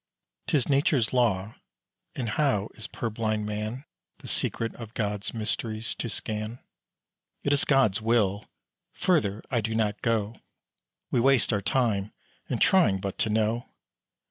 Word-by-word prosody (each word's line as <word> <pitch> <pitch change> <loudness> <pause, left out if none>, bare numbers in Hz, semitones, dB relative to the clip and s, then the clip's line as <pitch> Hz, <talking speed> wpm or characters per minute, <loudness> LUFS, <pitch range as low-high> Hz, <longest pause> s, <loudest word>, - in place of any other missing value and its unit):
'Tis 150 -8 +2
Nature's 140 -4 +2
law; 110 -4 +2 0.6
and 120 -4 -2
how 110 -5 +1
is 110 - -8
purblind 110 -2 -2
man 105 +6 -4 0.3
The - - -12
secret 115 0 -1
of 115 -2 -10
Gods 105 -2 -1
mysteries 110 0 -2
to 120 - -4
scan? 110 +2 -3 0.9
It 140 - +2
is 145 - +3
God's 120 -7 +3
will; 110 -3 +1 0.5
further 110 - +1
I 120 -3 +2
do 110 +1 -2
not 105 -2 0
go: 110 -1 0 0.7
We - - +3
waste 130 -1 +4
our 100 - +1
time 105 -3 0 0.4
in - - 0
trying 145 - +4
but 95 0 -5
to 110 - +2
know. 110 +2 0
110 Hz, 140 wpm, -27 LUFS, 105-120 Hz, 0.9 s, waste